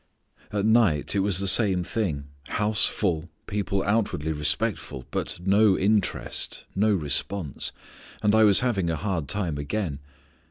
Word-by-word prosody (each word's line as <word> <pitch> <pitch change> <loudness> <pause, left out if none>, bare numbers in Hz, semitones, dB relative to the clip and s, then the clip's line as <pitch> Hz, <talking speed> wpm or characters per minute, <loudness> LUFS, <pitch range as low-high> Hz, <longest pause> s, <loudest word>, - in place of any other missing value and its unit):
"At 105 -1 -1
night 110 -10 +3
it 100 - +1
was 95 -2 +1
the 100 - +1
same 95 -2 +5
thing: 85 -8 -3 0.2
house 105 0 +1
full, 85 -5 -2 0.2
people 100 -1 -2
outwardly 100 -7 -1
respectful, 75 -3 -1
but - - -4
no 100 0 +4
interest, 105 0 -1
no 105 +2 +2
response. 85 -1 -1 0.5
And 105 0 +3
I 110 0 +5
was 105 0 +5
having 105 -9 0
a 80 - -1
hard 90 -4 -3
time 85 -4 -1
again. 75 0 -3
100 Hz, 145 wpm, -25 LUFS, 80-105 Hz, 0.5 s, same